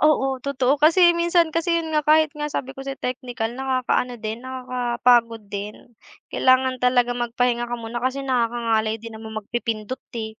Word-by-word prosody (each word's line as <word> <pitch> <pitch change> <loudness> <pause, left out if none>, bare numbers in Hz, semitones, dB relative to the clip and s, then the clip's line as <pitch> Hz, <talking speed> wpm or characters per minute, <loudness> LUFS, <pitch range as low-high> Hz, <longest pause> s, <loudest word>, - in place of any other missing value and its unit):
Oo, 270 -4 +2
totoo. 275 +1 0
Kasi 345 +3 +6
minsan 340 -1 +2
kasi 335 +1 +1
yun 320 -1 -3
nga 305 - +3
kahit 310 0 +4
nga 300 -1 -4
sabi 270 -2 -4
ko 270 - -10
sa'yo 270 0 -5
teknikal 245 -2 -3
nakaka-ano 255 -1 -1
din 220 +1 -5
nakaka-pagod 245 -3 +1
din. 205 +1 -5 0.6
Kailangan 255 0 +3
talaga 250 -1 +3
magpahinga 240 0 -1
ka 240 - -3
muna 230 +1 -5
kasi 260 +2 -2
nakakangalay 230 -3 0
din 225 0 -10
naman 220 -1 -8
magpipindot, 225 +2 -4 0.2
eh. 220 0 -6
250 Hz, 160 wpm, -23 LUFS, 235-275 Hz, 0.6 s, Kasi